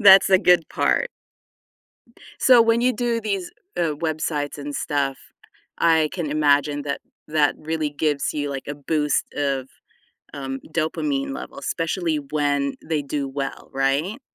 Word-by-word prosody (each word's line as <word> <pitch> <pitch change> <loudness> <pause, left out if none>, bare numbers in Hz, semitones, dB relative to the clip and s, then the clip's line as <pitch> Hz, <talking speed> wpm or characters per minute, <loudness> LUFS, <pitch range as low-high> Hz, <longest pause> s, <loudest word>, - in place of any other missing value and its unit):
That's 195 -2 +8
a 190 - +7
good 180 -3 +4
part. 485 - +1 1.3
So, 250 -3 +7
when 230 +1 +3
you 250 +1 +3
do 240 -2 0
these, 200 -4 -2 0.3
uh, 160 -3 +1
websites 150 -2 -2
and 145 0 -5
stuff, 140 -2 -1 0.6
I 160 -2 +4
can 170 -6 -3
imagine 145 -1 +2
that 140 0 -3 0.3
that 150 -1 +3
really 155 -1 -2
gives 145 -1 0
you, 145 -1 -2
like, 135 -1 -5
a 145 - -3
boost 150 +1 0
of, 135 -2 -1 0.7
um, 135 -1 -4
dopamine 275 - -1
levels, 280 +1 -7
especially 165 -1 -1
when 145 -1 0
they 155 -2 -1
do 140 0 -2
well, 135 0 -5
right? 140 - 0
150 Hz, 140 wpm, -23 LUFS, 145-180 Hz, 1.3 s, That's